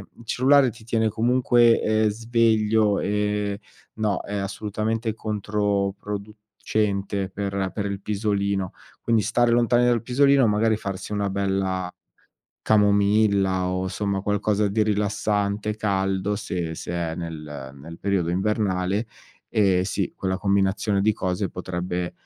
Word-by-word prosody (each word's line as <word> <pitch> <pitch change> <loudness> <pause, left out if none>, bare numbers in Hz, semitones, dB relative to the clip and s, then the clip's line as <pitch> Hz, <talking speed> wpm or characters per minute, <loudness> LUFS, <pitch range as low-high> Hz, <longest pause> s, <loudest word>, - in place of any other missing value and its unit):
il 115 - -15
cellulare 130 +3 +4
ti 115 0 -12
tiene 110 -1 +1
comunque, 120 +1 +3
ehm, 110 0 +2
sveglio, 110 -1 +2
ehm, 105 0 -1 0.4
no, 105 -3 0
è 105 - -6
assolutamente 105 +3 -2
controproducente 105 -1 -2
per 100 -1 -2
per 100 -2 -3
il 100 -1 -3
pisolino. 100 -2 -1 0.3
Quindi 115 -3 +2
stare 120 +1 +2
lontani 120 +1 +3
dal 120 -2 +2
pisolino, 135 +1 +4
magari 110 +1 +2
farsi 100 -1 -6
una 100 -1 -1
bella 95 -2 -1 0.7
camomilla 100 -2 +3
o 90 0 -1
insomma 100 +1 -2
qualcosa 105 +1 0
di 110 +2 +1
rilassante, 105 0 0
caldo, 95 -1 0
se 85 -5 -4
se 85 - -6
è 85 -2 -2
nel 75 -5 -7
nel 80 +5 -11
periodo 95 -4 0
invernale, 100 +1 0 0.4
ehm, 100 -5 +3
sì 95 0 -2
quella 95 -1 -2
combinazione 100 +1 +1
di 110 +2 +3
cose 95 +1 -2
potrebbe 90 0 -4
100 Hz, 125 wpm, -24 LUFS, 95-110 Hz, 0.7 s, cellulare